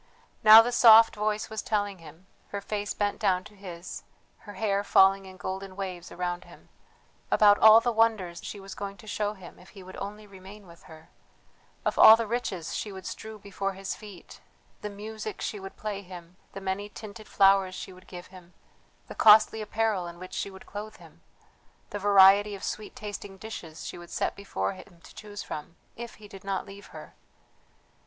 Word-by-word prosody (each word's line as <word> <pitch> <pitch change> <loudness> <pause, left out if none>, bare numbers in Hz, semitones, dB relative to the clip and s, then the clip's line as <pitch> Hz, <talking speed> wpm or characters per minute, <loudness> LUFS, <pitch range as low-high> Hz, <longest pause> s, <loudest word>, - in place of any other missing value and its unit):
Now 220 +1 +10
the 245 - -2
soft 225 -2 +7
voice 210 0 -1
was 220 -2 -3
telling 205 -3 -2
him 165 +3 -15 0.2
her 200 - -4
face 205 0 -4
bent 205 -1 -2
down 185 -4 +1
to 210 - -15
his, 180 -3 -9 0.4
her 205 - -12
hair 200 -2 0
falling 195 -1 +4
in 185 0 -12
golden 190 +1 -6
waves 185 -3 -6
around 175 0 -4
him - - -17 0.6
about 205 -1 +5
all 220 +1 +9
the 240 - 0
wonders 220 -6 +1
she 205 - -7
was 195 0 -9
going 200 0 -7
to 180 - -15
show 210 0 -3
him 185 -3 -13
if 180 - -17
he 190 - -10
would 185 +1 -11
only 210 +2 -7
remain 195 +1 -13
with 170 -1 -17
her, 160 0 -15 0.8
of - - -1
all 220 - +10
the 230 0 -3
riches 205 -7 -4
she 210 - -4
would 190 -1 -10
strew 220 0 -7
before 195 -1 -4
his 195 0 -5
feet, 205 -5 -13 0.4
the 210 - -5
music 215 +1 -7
she 210 - -4
would 195 0 -10
play 210 -2 -5
him, 180 -2 -12 0.2
the 195 - -7
many 195 +2 -3
tinted 215 0 -11
flowers 195 -1 +3
she 190 - -8
would 185 +1 -18
give 175 -1 -9
him, 180 -1 -15 0.5
the - - -8
costly 215 +1 +6
apparel 215 -4 -1
in 170 0 -10
which 185 +1 -10
she - - -3
would 190 -1 -13
clothe 210 +1 -8
him, - - -18 0.7
the 205 - -4
variety 200 +1 +6
of 195 - -11
sweet 215 - -5
tasting 205 -2 -8
dishes 175 -7 -9
she - - -7
would 175 0 -12
set - - -2
before 200 0 -3
him 185 -2 -15
to - - -15
choose 205 -1 -9
from... 155 +3 -8 0.2
if 235 0 -8
he 210 0 -14
did 195 -2 -13
not 195 -1 -3
leave 200 0 -12
her! 155 -3 -12
200 Hz, 195 wpm, -27 LUFS, 185-210 Hz, 0.8 s, Now